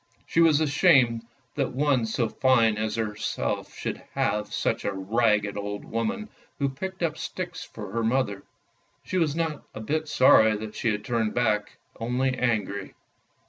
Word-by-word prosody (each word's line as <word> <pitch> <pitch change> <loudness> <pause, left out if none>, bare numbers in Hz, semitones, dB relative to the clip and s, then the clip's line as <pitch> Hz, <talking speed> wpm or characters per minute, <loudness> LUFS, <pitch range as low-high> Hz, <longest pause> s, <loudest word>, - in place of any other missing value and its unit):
She 165 - +2
was 160 -3 +5
ashamed 135 -7 +3 0.3
that 135 -4 -1
one 135 -4 +2
so 115 +1 0
fine 115 -2 +3
as 110 0 -1
herself 105 -2 -2
should - - -3 0.2
have 105 0 0
such - - -1
a - - 0
ragged 105 +1 +1
old 105 0 -4
woman 115 - -2 0.3
who 140 -1 +1
picked 185 +7 -5
up 155 -2 -1
sticks 180 -2 -5
for 105 -4 -9
her 115 +2 -1
mother. 115 -4 0 0.6
She 185 - -1
was 155 -3 +1
not 160 -3 -2
a - - -5
bit 155 +8 -2
sorry 110 -6 +5
that 110 0 -7
she 120 - -1
had 105 -1 -2
turned 115 -3 0
back, 110 -4 0 0.2
only 125 +3 0
angry. 110 -5 -1
115 Hz, 160 wpm, -26 LUFS, 110-145 Hz, 0.6 s, was